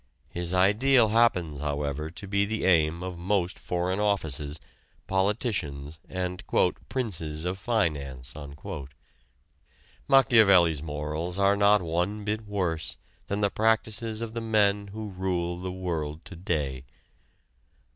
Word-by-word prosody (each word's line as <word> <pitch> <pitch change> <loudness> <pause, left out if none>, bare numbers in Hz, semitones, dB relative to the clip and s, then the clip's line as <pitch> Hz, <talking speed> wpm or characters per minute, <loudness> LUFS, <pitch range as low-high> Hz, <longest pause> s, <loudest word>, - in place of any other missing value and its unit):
His 85 0 -3
ideal 110 +6 +4
happens, 90 -10 +2
however, 75 +1 -2
to 85 +5 -9
be 100 +1 +2
the 110 +2 -2
aim 85 -1 +3
of 90 -2 -6
most 95 0 0
foreign 90 +2 -1
offices, 80 -8 0 0.5
politicians 95 - -1
and 90 0 -3 0.5
"princes 85 - -2
of 90 +2 -2
finance." 75 - -1 1.7
Machiavelli's 100 - +5
morals 75 +3 -3
are 100 0 +4
not 100 -1 +4
one 90 +6 -1
bit 105 +1 -3
worse 90 -6 -2 0.3
than 100 +1 -2
the 100 -1 +2
practices 110 0 +1
of 110 -1 -6
the 115 - -3
men 105 -2 +2
who 105 +1 -6
rule 90 -2 -2
the 90 0 -4
world 80 -4 -4
to 95 - -9
day. 75 -7 -2
95 Hz, 120 wpm, -27 LUFS, 80-105 Hz, 1.7 s, Machiavelli's